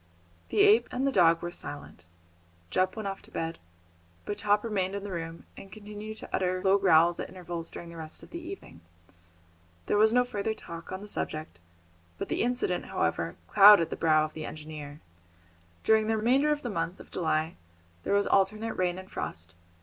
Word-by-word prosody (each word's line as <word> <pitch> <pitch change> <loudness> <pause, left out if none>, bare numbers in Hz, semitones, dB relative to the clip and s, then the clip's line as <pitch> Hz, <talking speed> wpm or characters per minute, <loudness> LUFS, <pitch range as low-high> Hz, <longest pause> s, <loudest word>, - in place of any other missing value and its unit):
The - - +2
ape 415 +2 +6
and 255 +2 -2
the 275 - +2
dog 170 -6 +4
were 175 - -3
silent. 145 - -9 0.7
Jup 185 0 +1
went 215 -2 -4
off 195 0 -5
to - - -14
bed, 165 0 -4 0.7
but 205 0 -4
Top 205 0 +2
remained 200 -4 -1
in 200 - -4
the 205 - -6
room, 165 -1 -5
and 195 - -12
continued 210 +1 -8
to - - -9
utter 185 0 0
low 195 +1 +4
growls 170 -2 +4
at - - -4
intervals 175 -2 -6
during 170 - -9
the 170 - -10
rest 160 -1 -8
of - - -14
the 340 - -5
evening. 340 - -10 1.0
There 205 - +1
was 220 +1 +5
no 245 +1 +4
further 220 -2 -2
talk 170 -4 -9
on 185 +1 -5
the 210 - -9
subject, 155 - -4 0.6
but - - -5
the - - 0
incident, 245 - 0
however, - - -1
clouded 205 -4 +8
the - - -2
brow 155 -1 +3
of 155 - -9
the 155 - -6
engineer. 150 -1 -8 0.8
During 220 -1 +4
the 220 0 +1
remainder 260 +7 +3
of 295 0 -1
the 245 - -3
month 165 -1 -3
of - - -14
July 160 -1 0 0.5
there 200 - 0
was 200 - +3
alternate 215 +3 +1
rain 180 -1 0
and 190 0 -9
frost. 85 +2 -5
190 Hz, 195 wpm, -29 LUFS, 165-215 Hz, 1.0 s, clouded